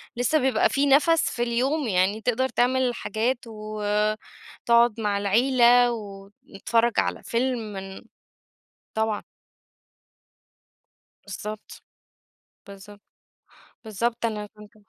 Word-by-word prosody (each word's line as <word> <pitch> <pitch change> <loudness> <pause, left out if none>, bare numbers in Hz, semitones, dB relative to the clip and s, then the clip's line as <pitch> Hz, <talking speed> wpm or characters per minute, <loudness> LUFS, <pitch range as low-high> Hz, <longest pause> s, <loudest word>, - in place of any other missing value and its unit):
لسه 245 +6 +1
بيبقى 255 -4 +2
في 280 +1 +1
نفَس 310 +4 +3
في 240 - -2
اليوم 255 +5 0
يعني 195 +2 +1
تقدَر 255 +3 0
تعمل 250 0 +1
حاجات 230 +5 -1
وتقعد 215 +2 -1
مع 205 -2 0
العيلة 240 +3 +4
ونتفرّج 205 +2 -2
على 90 -1 -2
فيلم 250 +2 -1 0.2
من 195 0 -8 0.9
طبعًا. 220 -1 -1 2.0
بالضبط، 210 +2 -8 0.9
بالضبط، 200 +1 -13 0.8
بالضبط، 230 +2 -3
أنا 210 -2 -4
كنت 210 +1 -15
225 Hz, 95 wpm, -24 LUFS, 210-245 Hz, 2.0 s, العيلة